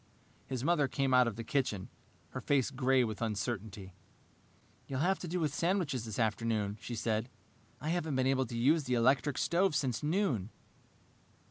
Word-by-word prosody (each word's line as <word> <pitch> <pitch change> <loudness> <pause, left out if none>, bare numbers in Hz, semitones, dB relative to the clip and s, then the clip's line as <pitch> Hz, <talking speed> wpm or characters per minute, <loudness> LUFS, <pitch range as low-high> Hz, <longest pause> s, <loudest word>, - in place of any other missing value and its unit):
His 130 -2 -3
mother 150 -2 +3
came 135 -1 0
out 125 -1 +6
of 115 - -3
the 115 - -5
kitchen, 115 -6 -1 0.4
her - - -6
face 140 -2 +1
gray 130 -1 +3
with 110 -2 -4
uncertainty. 105 -3 -3 0.9
"You'll 135 0 -2
have 190 +4 +2
to 180 - -6
do 180 +2 -2
with 155 -4 0
sandwiches 160 - 0
this 110 -3 -5
afternoon," 110 -2 0
she 120 - -5
said. 110 +1 -1 0.5
"I 155 - -4
haven't 160 -4 -1
been 130 0 +2
able 130 0 +2
to 120 - -5
use 145 +5 +3
the 125 -1 +1
electric 130 +3 +2
stove 175 -1 +2
since 130 -5 0
noon." 150 - 0
130 Hz, 170 wpm, -32 LUFS, 115-150 Hz, 0.9 s, out